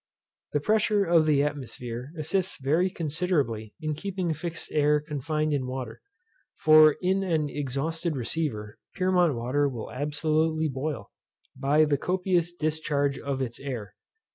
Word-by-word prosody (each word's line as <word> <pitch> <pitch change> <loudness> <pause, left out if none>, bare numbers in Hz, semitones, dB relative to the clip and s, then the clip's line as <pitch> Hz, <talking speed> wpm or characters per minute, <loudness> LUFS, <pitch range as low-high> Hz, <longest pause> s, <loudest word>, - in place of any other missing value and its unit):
The 145 - +2
pressure 210 +4 +2
of 165 -2 +4
the 145 -2 +4
atmosphere 130 -3 -5
assists 175 +5 -1
very 155 +8 +2
considerably 150 - -1
in 155 -1 -2
keeping 185 +1 -2
fixed 165 +2 -5
air 150 0 +3
confined 150 +1 -2
in 130 -3 -1
water; 130 0 -5 0.6
for 155 -1 +7
in 190 +2 +2
an 160 -6 0
exhausted 155 +4 -2
receiver, 120 -5 -3 0.2
Pyrmont 180 -5 +3
water 130 +5 +1
will 120 -5 -6
absolutely 155 +3 0
boil, 130 -5 -4 0.4
by 145 +3 +3
the 145 -2 +1
copious 180 -1 +1
discharge 150 -4 -1
of 135 -1 -2
its 120 -2 -6
air. 120 -8 -5
150 Hz, 135 wpm, -27 LUFS, 135-165 Hz, 0.6 s, for